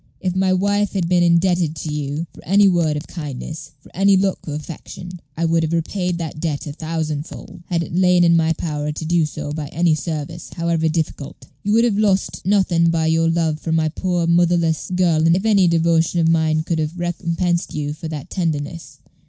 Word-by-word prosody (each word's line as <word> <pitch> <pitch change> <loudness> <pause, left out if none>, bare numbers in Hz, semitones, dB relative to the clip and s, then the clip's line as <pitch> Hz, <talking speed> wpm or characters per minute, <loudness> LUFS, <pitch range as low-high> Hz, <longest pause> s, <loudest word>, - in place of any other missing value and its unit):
If 185 -1 -2
my 190 0 +2
wife 200 +2 +1
had 185 -4 0
been 180 0 +3
indebted 170 -1 +2
to 150 0 -5
you 150 +2 -3
for - - -14
any 200 +3 +4
word 170 -5 +2
of 150 - -6
kindness, 155 -1 -7
for 140 - -20
any 195 +1 +4
look 190 0 +1
of 150 - -3
affection, 175 +3 -8 0.2
I 165 - 0
would 165 0 +2
have 160 0 -1
repaid 180 +1 -1
that 160 -3 -5
debt 155 -3 -2
a 145 - -6
thousand 155 -1 -3
fold, - - -11
had 170 -1 0
it - - -8
lain 180 0 +4
in 170 -1 +5
my 165 0 +3
power 150 -2 -3
to 155 +1 -6
do 165 -1 +2
so 145 - -6
by 150 -1 -4
any 165 +2 +1
service, 155 +2 -4
however 165 -1 0
difficult. 155 -3 -4 0.2
You 205 - 0
would 230 +1 +5
have 210 -4 +1
lost 195 -3 +1
nothing 180 -4 +3
by 165 -1 +1
your 165 +1 +2
love 165 -2 0
for 160 - -4
my 160 -1 +2
poor 175 +1 -1
motherless 170 -1 +2
girl 165 -3 +3
if 190 +4 -2
any 200 -4 +4
devotion 165 0 +2
of 165 - +3
mine 160 -1 +2
could 165 -1 -1
have 155 +3 -3
recompensed 175 0 -1
you 145 -1 -2
for 160 +1 -7
that 150 -3 -7
tenderness. 160 -3 -3
165 Hz, 205 wpm, -20 LUFS, 155-180 Hz, 0.2 s, in